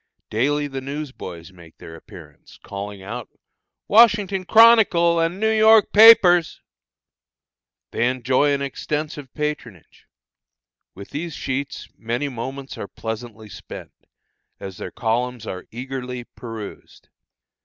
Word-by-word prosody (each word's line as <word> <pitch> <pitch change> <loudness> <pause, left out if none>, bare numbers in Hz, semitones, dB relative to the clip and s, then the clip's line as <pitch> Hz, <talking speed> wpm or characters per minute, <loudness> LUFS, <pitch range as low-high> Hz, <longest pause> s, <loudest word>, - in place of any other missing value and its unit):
Daily 145 +7 0
the 135 -2 -6
news 140 +1 -6
boys 85 -6 -10
make 85 -2 -17
their 80 - -11
appearance, - - -15
calling 100 0 -7
out: 115 +4 -7 0.6
"Washington 205 -4 +4
Chronicle 205 -7 +5
and 165 +3 -1
New 220 +1 +1
York 220 0 +5
papers!" 195 -6 +7 1.3
They 120 - +1
enjoy 130 +3 +1
an 140 0 -1
extensive 145 0 -5
patronage. 150 - -6 0.9
With 100 +1 -11
these 160 +1 -5
sheets 135 +1 -4
many 120 +5 -3
moments 130 +2 -7
are - - -6
pleasantly 110 0 -7
spent, - - -11 0.7
as 95 -2 -8
their - - -6
columns 120 +1 -2
are 90 - -7
eagerly 125 0 -6
perused. 115 -3 -11
135 Hz, 115 wpm, -21 LUFS, 115-165 Hz, 1.3 s, papers